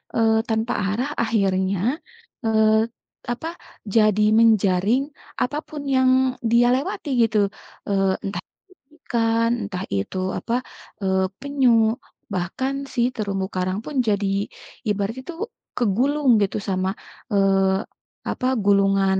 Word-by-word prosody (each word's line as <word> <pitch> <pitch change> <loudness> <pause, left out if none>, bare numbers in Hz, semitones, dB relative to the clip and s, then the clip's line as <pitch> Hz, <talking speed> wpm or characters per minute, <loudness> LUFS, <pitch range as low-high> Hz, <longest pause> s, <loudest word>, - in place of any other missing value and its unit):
eee, 225 -1 +3
tanpa 225 +2 0
arah 235 +8 -1
akhirnya, 195 -4 +1 0.6
eee, 220 -1 +4 0.6
apa, 285 +7 -6 0.5
jadi 215 -1 +4 0.2
menjaring 215 +2 +3 0.4
apa 290 +4 0
pun 300 -1 -6
yang 260 0 +4 0.4
dia 240 +1 +5
lewati 275 +2 -3
gitu. 225 -1 +1 0.5
Eee, 195 -1 +1
entah 195 - -4
itu 385 - -28 0.3
ikan 230 -1 +2
entah 190 -2 -4
itu, 100 - -3 0.2
apa, 230 - -3 0.5
eee, 190 -1 +1 0.2
penyu 245 -5 +3 0.4
bahkan 190 +10 -2 0.2
si 245 - 0
terumbu 195 -3 -2
karang 185 +1 -1
pun 300 - -6
jadi 205 -1 +1 0.6
ibaratnya 210 +5 -1
itu 340 +4 -8 0.4
kegulung 260 +6 +1
gitu 200 0 0
sama, 185 0 0 0.4
eee, 195 -1 +3 0.5
apa 255 - -1 0.2
gulungan 195 -1 +3
215 Hz, 115 wpm, -23 LUFS, 195-235 Hz, 0.6 s, dia